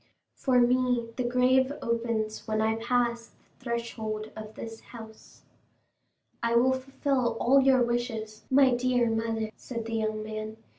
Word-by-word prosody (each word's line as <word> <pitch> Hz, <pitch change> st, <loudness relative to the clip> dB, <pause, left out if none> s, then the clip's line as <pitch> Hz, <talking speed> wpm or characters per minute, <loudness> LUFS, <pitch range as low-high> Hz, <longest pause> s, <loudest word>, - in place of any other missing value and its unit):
For 255 Hz, -3 st, +2 dB
me 245 Hz, -1 st, +2 dB
the 255 Hz, -, -1 dB
grave 255 Hz, +2 st, +3 dB
opens 230 Hz, -2 st, -2 dB
when 215 Hz, 0 st, 0 dB
I 220 Hz, +1 st, +1 dB
pass 235 Hz, 0 st, 0 dB
the -, -, -29 dB, 0.3 s
threshold 225 Hz, -3 st, -4 dB
of 215 Hz, 0 st, -9 dB
this 225 Hz, 0 st, -8 dB
house." 220 Hz, -2 st, -13 dB, 1.0 s
"I 235 Hz, 0 st, +1 dB
will 255 Hz, +2 st, +4 dB
fulfil 260 Hz, -2 st, -1 dB
all 270 Hz, +3 st, +5 dB
your 265 Hz, -2 st, +4 dB
wishes, 225 Hz, -3 st, -3 dB
my 265 Hz, -1 st, +5 dB
dear 245 Hz, -1 st, +2 dB
mother," 225 Hz, -1 st, -1 dB
said 230 Hz, -3 st, -6 dB
the 230 Hz, -, -5 dB
young 215 Hz, -1 st, -2 dB
man. 215 Hz, 0 st, -6 dB
235 Hz, 145 wpm, -28 LUFS, 220-250 Hz, 1.0 s, all